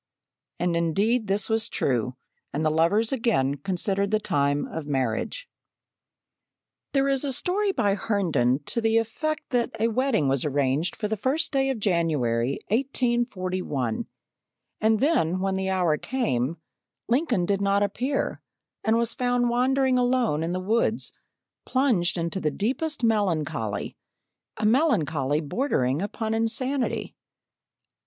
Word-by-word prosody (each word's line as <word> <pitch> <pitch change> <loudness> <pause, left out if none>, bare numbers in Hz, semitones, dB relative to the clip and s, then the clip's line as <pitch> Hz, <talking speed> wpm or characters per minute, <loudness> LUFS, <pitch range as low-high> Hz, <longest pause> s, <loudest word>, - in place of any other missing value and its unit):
And 175 0 +1
indeed 205 +8 +1
this 200 +2 +1
was 220 0 0
true, 125 -1 0 0.4
and 150 +3 -2
the 155 - +3
lovers 170 +8 +2
again 205 - +1
considered 195 +5 0
the 215 +1 +2
time 145 -7 0
of 155 -2 -6
marriage. 135 - -1 1.5
There 275 -1 +3
is 275 0 +1
a 280 - -1
story 390 +9 +1
by 205 - +1
Herndon 170 - +1
to 235 - -2
the 225 0 +3
effect 290 +8 -2
that 245 -4 -1
a 225 +1 +2
wedding 235 - +1
was 135 -1 +1
arranged 145 +3 0
for 210 - -2
the 220 - -1
first 280 - 0
day 270 -1 +1
of 265 - -1
January, 145 - +1
1841, 205 - -1 0.7
and 220 0 +3
then 185 - +2
when 190 0 0
the 190 0 -1
hour 180 -5 +1
came 150 - -1 0.5
Lincoln 240 - +1
did 200 +1 0
not 200 0 +2
appear, 250 +7 -1 0.4
and 220 +1 +3
was 235 0 0
found 245 -1 +1
wandering 255 +1 +2
alone 245 -10 +1
in 165 +1 -1
the 180 - -1
woods 220 +4 0 0.5
plunged 240 -11 +1
in 170 0 -1
the 165 -3 -1
deepest 260 - -2
melancholy 155 - 0 0.6
a 215 - -1
melancholy 160 - +2
bordering 145 - 0
upon 220 +2 -3
insanity. 250 +4 -1
205 Hz, 135 wpm, -25 LUFS, 155-245 Hz, 1.5 s, the